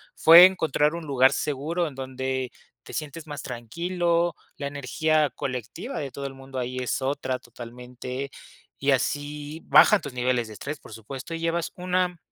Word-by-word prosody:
fue 170 +3 +10
encontrar 160 -4 +2
un 170 -2 -6
lugar 130 -2 +4
seguro 155 +5 -1
en 140 - -9
donde 130 -1 -3 0.3
te - - -11
sientes 155 +1 -5
más 145 -1 -6
tranquilo, 170 +8 -1 0.2
la 140 - -4
energía 150 +2 +1
colectiva 130 - -5
de 140 -3 -4
todo 140 - -6
el 135 - -5
mundo 135 0 -10
ahí 125 0 -3
es 125 +1 -1
otra, 135 -1 -1
totalmente, 125 +2 -7 0.5
y 140 +1 +2
así 145 +3 -2
bajan 210 -2 +7
tus 145 -4 -7
niveles 125 -2 0
de 110 - -9
estrés, 140 +7 -6
por - - -13
supuesto, 130 +8 -8
y 165 - -3
llevas 165 0 -1
una 180 0 0
140 Hz, 165 wpm, -26 LUFS, 130-165 Hz, 0.5 s, fue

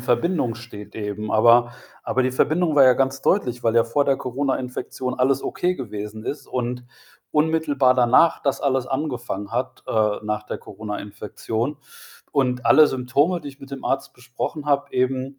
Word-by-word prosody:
Verbindung 125 0 0
steht 105 -3 -11
eben. 105 0 -4
Aber 120 +2 +5 0.3
Aber, 130 - 0
die 130 - 0
Verbindung 160 +4 +1
war 140 - +6
ja 130 -1 +7
ganz 135 +1 0
deutlich, 125 - +1
weil 115 0 +1
ja 115 - +5
vor 140 +5 +1
der 135 - +2
Coronainfektion 130 -1 -3
alles 135 +1 +1
okay 180 +1 -1
gewesen 105 -2 -6
ist 145 - -5
und 125 0 -3 0.5
unmittelbar 150 -4 +2
danach, 125 +6 +4
das 140 -2 0
alles 130 -2 0
angefangen 120 -8 -3
hat, 125 +2 -3
äh, 105 -1 +1
nach 105 0 -2
der - - -6
Coronainfektion. 105 +5 -5 0.6
Und 125 -2 0
alle 155 - +7
Symptome, 140 +7 +1
die - - -8
ich 140 0 -13
mit 135 - -12
dem 135 -1 -7
Arzt 135 0 -1
besprochen 125 +5 -6
habe, 140 -1 +1
eben 130 +1 -1
125 Hz, 165 wpm, -23 LUFS, 115-140 Hz, 0.6 s, ja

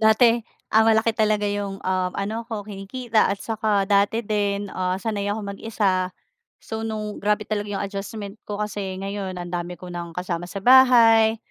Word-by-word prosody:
dati, 230 +2 +5 0.3
ah, 220 - +6
malaki 220 0 +4
talaga 215 -2 +1
yung, 205 -1 -2
um, 185 -1 0
ano 215 +4 -3
ko, 210 -3 -4
kinikita 215 +3 0
at 200 - 0
saka 215 -3 +1
dati 205 +3 +2
din, 205 -1 -1
ah, 185 0 -1
sanay 205 0 -2
akong 205 -1 -3
mag-isa. 195 -5 0 0.5
So, 220 0 -6
nung 215 -1 -4
grabe 210 +1 +1
talaga 205 0 -3
yung 200 -1 -2
adjustment 200 +1 -6
ko 205 - -3
kasi 205 -3 -3
ngayon, 195 -1 -4
ang 175 0 -6
dami 175 0 -3
ko 180 -1 -9
nang 170 -1 -6
kasama 175 -1 -3
sa 195 - -6
bahay. 230 -4 +7
205 Hz, 170 wpm, -23 LUFS, 195-220 Hz, 0.5 s, bahay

